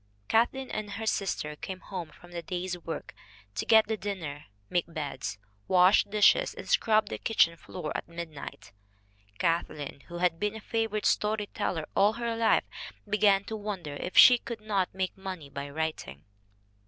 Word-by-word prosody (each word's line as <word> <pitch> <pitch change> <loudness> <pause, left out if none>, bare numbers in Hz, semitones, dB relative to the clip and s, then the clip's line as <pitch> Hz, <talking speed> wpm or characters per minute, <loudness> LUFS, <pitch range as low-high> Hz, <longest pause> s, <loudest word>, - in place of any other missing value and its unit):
Kathleen 255 +3 +1
and 210 -2 -4
her 220 +2 -4
sister 185 -8 -1
came 185 +4 -6
home 180 -4 -6
from 175 +3 -17
the 170 -1 -4
day's 180 +1 -3
work 165 -2 -6 0.4
to 105 - -3
get 220 -1 +7
the 220 - -1
dinner, 165 -8 -5 0.2
make 170 - -1
beds, 145 -8 -4 0.3
wash 185 +2 +6
dishes 210 - +4
and - - -8
scrub 215 -2 +3
the - - -4
kitchen 170 -7 +3
floor 155 -1 -6
at - - -3
midnight. 165 -10 -8 0.7
Kathleen, 155 -3 -1
who 175 - -7
had 175 -2 +1
been 210 +1 -1
a - - -6
favorite 220 -1 -2
story 210 0 +2
teller 170 -7 -2
all 205 +2 +5
her 235 0 -2
life, 225 -1 +3 0.4
began 205 -1 +4
to 220 - -5
wonder 200 -8 -5
if 180 +5 -5
she 245 -1 +10
could 235 -2 -7
not 200 -4 0
make 190 -1 -2
money 185 -7 -7
by 140 +1 -5
writing. 150 - -4
190 Hz, 165 wpm, -29 LUFS, 165-215 Hz, 0.7 s, she